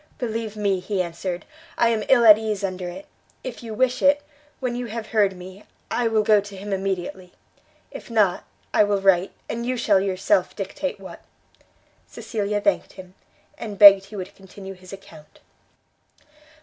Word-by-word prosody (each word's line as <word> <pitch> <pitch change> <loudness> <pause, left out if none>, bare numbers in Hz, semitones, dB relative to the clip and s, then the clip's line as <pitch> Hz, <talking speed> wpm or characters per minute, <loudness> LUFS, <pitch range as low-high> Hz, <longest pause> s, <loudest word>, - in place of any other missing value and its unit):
"Believe 225 -3 -4
me," 200 -3 0
he 195 +2 -3
answered, 175 0 -4 0.3
"I 235 - +3
am 220 -2 0
ill 240 -3 +5
at 215 -1 +9
ease 215 -2 -3
under 185 -2 -3
it: 285 +12 -9 0.4
if 255 -2 -7
you 225 -2 -7
wish 255 +2 +1
it, 285 +1 +4 0.4
when 250 -2 -2
you 245 0 -4
have 230 0 -6
heard 200 -4 +2
me, 185 +3 -11 0.3
I 245 - +1
will 220 -1 +2
go 210 -1 +4
to 200 -1 -11
him 200 +1 -5
immediately; 190 -1 -4 0.6
if - - -10
not, 210 -6 +2 0.3
I - - +5
will 205 -1 +1
write, 195 -1 +3 0.2
and 235 +1 -4
you 250 +1 -2
shall 210 -4 +3
yourself 195 +10 0
dictate - - -4
what." - - -11 0.9
Cecilia 210 -2 -3
thanked 300 - 0
him, 185 -1 -12 0.5
and 210 -3 -6
begged 200 -1 +9
he 210 - -12
would 185 -2 -7
continue 195 0 -11
his 185 0 -15
account. 195 -6 -14
205 Hz, 170 wpm, -23 LUFS, 190-230 Hz, 0.9 s, at